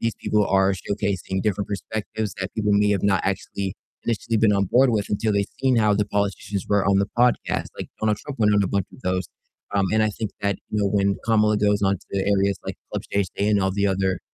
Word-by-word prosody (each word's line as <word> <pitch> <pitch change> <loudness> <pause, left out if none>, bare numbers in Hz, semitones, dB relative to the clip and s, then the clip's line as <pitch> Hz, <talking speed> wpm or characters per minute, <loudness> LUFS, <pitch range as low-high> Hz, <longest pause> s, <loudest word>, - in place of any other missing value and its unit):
these 115 -1 0
people 105 -1 +1
are 95 0 +3
showcasing 95 0 -2
different 100 -2 -1
perspectives 105 +1 -4
that 95 0 -4
people 105 -1 +1
may 105 0 +3
have 100 -3 +1
not 100 -2 +2
actually 95 0 -2 0.3
initially 115 0 -1
been 105 -1 +4
on 100 -1 +2
board 125 +6 +4
with 105 -3 0
until 105 +1 0
they've 100 0 +1
seen 130 -2 +3
how 105 -2 +4
the 105 +1 +1
politicians 100 -1 -2
were 100 -2 +2
on 100 0 +3
the 100 +1 +1
podcast. 125 0 +2
Like, - - -5
Donald 105 -1 +1
Trump 140 0 -8
went 105 -1 +4
on 100 - +4
a - - +1
bunch 100 0 0
of - - -14
those, 90 -1 -1 0.5
um, 100 -1 +2
and 110 0 +3
I 110 - +3
think 105 0 -4
that, 100 -1 +1
you 105 - -1
know, 100 - +2
when 100 -1 +1
Kamala 105 -1 +3
goes 105 0 +2
on 100 0 +2 0.2
to 100 - 0
areas 100 0 +1
like - - -5 0.2
Club - - -2
Shay 100 - +2
Shay 100 +3 -2
and, 105 -2 +3
all 95 0 +1
the 100 +1 +1
other, 95 -1 0
100 Hz, 240 wpm, -23 LUFS, 100-105 Hz, 0.5 s, been